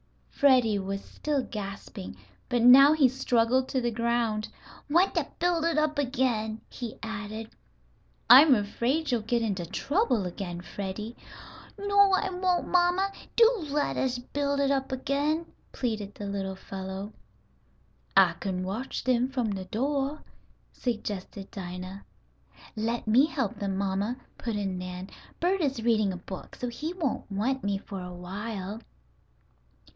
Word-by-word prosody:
Freddie 250 -7 +4
was 195 +1 -4
still 290 -3 -2
gasping, 195 - -7 0.3
but 245 -2 +1
now 275 +4 +9
he 300 -4 +5
struggled 255 0 +2
to 260 - 0
the 240 -1 0
ground. 230 -2 0 0.4
"Want 345 +6 +4
to - - 0
build 345 -2 +1
it 335 -1 +1
up 305 -1 +1
again," 245 -5 0
he 240 -3 -7
added. 220 0 -5 0.8
"I 255 +2 +11
am 295 -4 +6
afraid 245 +8 0
you'll 240 -2 +1
get 230 +2 0
into 190 -6 -2
trouble 285 - +1
again, 175 -1 -5
Freddie." 205 +5 -5 0.6
"No, 405 -1 +4
I 380 0 +1
won't, 360 -1 0
mamma. 360 +2 +3 0.2
Do 460 -8 +4
let 290 0 0
us 260 -1 0
build 280 +3 -2
it 280 0 +2
up 270 -1 0
again," 285 +5 0 0.3
pleaded 215 -5 -3
the 205 - -6
little 195 -1 -3
fellow. 190 +2 -6 1.0
"I 185 -3 +7
kin 185 -2 -2
watch 210 +8 -4
dem 255 0 +2
from 245 -6 -1
de 190 -1 -5
doah," 275 +7 -1 0.5
suggested 205 -4 -4
Dinah. 185 +1 -7 0.7
"Let 230 +2 -2
me 245 +7 +5
help 265 -10 -2
them, 195 -1 -2
mamma," 200 +5 -1 0.2
put 230 -3 -3
in 195 -3 -2
Nan. 180 +1 -6 0.3
"Bert 370 +2 +1
is 270 -6 -1
reading 215 -4 +3
a 185 - -5
book, 185 +1 -9
so 250 - -4
he 305 +7 -4
won't 290 - -2
want 245 +7 -1
me 200 -1 0
for 195 -1 -7
a 180 0 -7
while." 200 +3 -5
235 Hz, 145 wpm, -28 LUFS, 200-280 Hz, 1.0 s, I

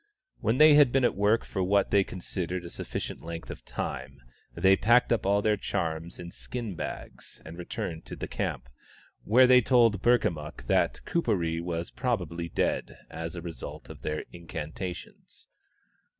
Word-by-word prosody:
When 115 +3 +1
they 155 +1 +8
had 145 -4 +7
been 135 0 +2
at 120 - +3
work 105 +3 +2
for 95 - -3
what 100 +1 +2
they 100 -1 +5
considered 90 -1 -4
a 85 - -8
sufficient - - -5
length 85 0 -7
of - - -9
time, 65 +3 -5 0.4
they 95 0 +5
packed 120 +4 +4
up 110 - -1
all 100 +1 +3
their 105 -1 +3
charms 80 -2 -3
in 85 0 -8
skin 115 -1 -5
bags, - - -7
and 80 - -8
returned 85 -2 -5
to - - -7
the - - -5
camp, - - -3 0.6
where 125 +5 +6
they 125 0 +7
told 115 -5 +4
Burkamukk 85 -11 +1
that - - +1
Kuperee 85 - 0
was 85 0 -3
probably 90 -10 -2
dead, - - -1
as 80 +1 -5
a 85 - -6
result 85 -2 -8
of - - -12
their 75 0 -3
incantations. 85 +1 -7
90 Hz, 165 wpm, -28 LUFS, 85-115 Hz, 0.6 s, they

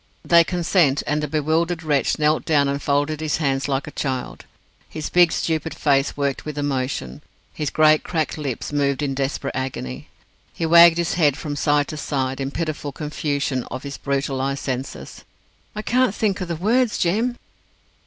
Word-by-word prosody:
They 170 -1 +6
consent, 170 -4 +1
and 150 +1 0
the 150 - -2
bewildered 160 +3 0
wretch 145 -3 +1
knelt 155 +1 +2
down 145 -3 +2
and 140 +1 -2
folded 145 +2 0
his 155 -2 0
hands 135 -3 0
like 135 -1 -1
a 150 - -8
child. 130 -4 -4 0.4
His 155 -1 -5
big, 175 -2 +5
stupid 160 0 -2
face 140 -2 +1
worked 140 -1 -1
with 150 -1 -6
emotion. 130 - -2 0.3
His 150 -2 -2
great 155 0 +4
cracked 160 -4 -2
lips 145 -2 -4
moved 140 0 0
in 140 -1 -1
desperate 135 +1 -3
agony. 125 - -5 0.5
He 165 - -2
wagged 170 0 +7
his 170 0 0
head 145 -3 +4
from 145 -2 -4
side 145 0 +2
to 155 - -5
side, 135 -2 -2
in 135 - -2
pitiful 155 -1 -4
confusion 145 -3 -2
of 130 +2 -7
his 140 -1 -7
brutalized 135 0 -2
senses. 130 0 -5 0.5
"I 215 - -4
can't 250 -3 +2
think 200 -3 0
o' - - -1
the 170 -1 -3
words, 225 +7 +1
Jem!" 225 +8 0
150 Hz, 175 wpm, -22 LUFS, 140-165 Hz, 0.5 s, wagged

